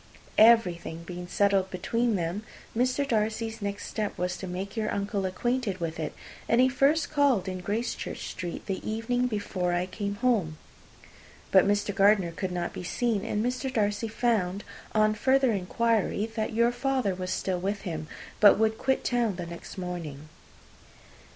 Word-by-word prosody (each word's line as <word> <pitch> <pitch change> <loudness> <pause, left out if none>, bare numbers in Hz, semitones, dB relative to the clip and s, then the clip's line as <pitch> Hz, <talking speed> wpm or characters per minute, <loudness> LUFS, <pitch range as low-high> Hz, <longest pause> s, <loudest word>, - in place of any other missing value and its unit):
Everything 180 -7 +4
being 175 +1 -7
settled 195 0 +2
between 230 +5 0
them, 175 +2 -2 0.3
Mr. 255 +4 +1
Darcy's 225 -1 -1
next 200 0 -3
step 215 -2 -3
was 180 0 -1
to 190 - -6
make 190 +3 -5
your 220 -2 -1
uncle 200 -1 -1
acquainted 220 +1 -1
with 165 -1 -3
it, 155 - -3 0.3
and 235 - +4
he 255 - +6
first 280 +4 +2
called 280 -10 +3
in 185 -1 -3
Gracechurch 220 +6 -3
Street 175 -4 -6
the 195 - -3
evening 245 +3 0
before 195 -5 -2
I 175 +1 +1
came 200 +2 -4
home. 205 -9 +1 0.9
But 190 0 +6
Mr. 205 0 +1
Gardiner 195 -3 +4
could 185 +2 -4
not 175 -1 -3
be - - -6
seen; 220 +2 0
and 215 0 -1
Mr. 255 +2 -2
Darcy 210 -1 0
found, 210 -4 0 0.3
on 215 0 +4
further 265 +3 +3
inquiry, 215 +2 +1
that 220 -2 -1
your 235 +2 +3
father 255 -4 0
was 185 0 -5
still 185 -1 -1
with 200 +3 -2
him, 160 -3 -5 0.3
but 205 -2 +8
would 220 +1 +1
quit 265 0 +1
town 235 -5 +1
the 175 -1 -5
next 170 +3 -9
morning. 165 -5 -6
205 Hz, 165 wpm, -28 LUFS, 185-235 Hz, 0.9 s, but